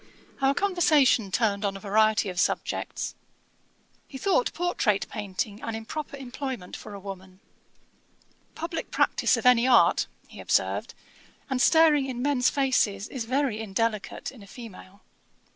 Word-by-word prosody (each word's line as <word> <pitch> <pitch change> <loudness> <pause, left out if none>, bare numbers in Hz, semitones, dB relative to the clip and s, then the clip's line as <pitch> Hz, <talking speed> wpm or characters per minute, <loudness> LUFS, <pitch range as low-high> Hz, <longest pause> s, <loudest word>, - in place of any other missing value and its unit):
Our 270 +1 +3
conversation 310 - +3
turned 200 0 0
on 195 -1 -1
a - - -10
variety 215 0 +2
of 180 -1 -4
subjects. - - -1 0.9
He 270 - -9
thought 395 - +1
portrait 300 - 0
painting 205 +1 -4
an 225 - -4
improper 280 +6 -6
employment 260 -6 -6
for 205 - -9
a - - -8
woman. 190 -1 -10 1.2
'Publick 330 0 -4
practice - - +2
of - - -5
any 250 0 +5
art, 250 -2 +4 0.2
(he - - -13
observed,) - - 0 0.6
and 255 -1 +1
staring 310 -4 +5
in 250 -2 -5
men's 270 -3 +2
faces, 230 -8 +1
is 250 -4 -5
very 255 -2 0
indelicate 220 0 -2
in 255 -5 -15
a 200 - -13
female.' 200 -3 -12
235 Hz, 140 wpm, -26 LUFS, 205-275 Hz, 1.2 s, any